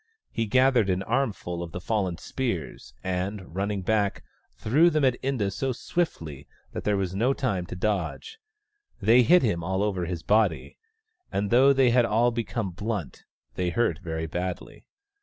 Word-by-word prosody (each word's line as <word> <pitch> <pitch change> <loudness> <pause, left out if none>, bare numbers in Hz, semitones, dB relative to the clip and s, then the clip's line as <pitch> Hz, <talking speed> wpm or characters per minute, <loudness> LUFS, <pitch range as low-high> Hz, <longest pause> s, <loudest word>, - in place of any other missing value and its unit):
He 115 -1 -1
gathered 130 -2 +3
an 95 +1 0
armful 105 -8 -2
of 85 -2 -7
the - - -4
fallen 95 -3 -1
spears, 85 - -4
and, 95 0 -3
running 100 0 -2
back, 105 0 0 0.3
threw 145 - +4
them 155 -4 +2
at 130 -2 +1
Inda 125 -7 -1
so 135 +5 -1
swiftly 80 - -3 0.2
that - - -6
there 105 -1 +2
was 95 -2 -2
no 120 +8 +1
time 95 -10 -1
to - - -6
dodge. 100 - -2 0.6
They 115 +5 +5
hit 175 +8 +5
him 85 -8 0
all 95 +3 0
over 95 -4 -1
his 85 -2 -4
body, 105 -6 +1 0.5
and 100 0 -1
though 130 +4 +6
they 135 -3 +4
had 120 0 +4
all 115 +3 +2
become 115 -3 -3
blunt, 100 - -5 0.3
they 90 -1 -1
hurt 85 -5 0
very 80 -2 -4
badly. 90 +2 -5
105 Hz, 165 wpm, -26 LUFS, 90-120 Hz, 0.6 s, though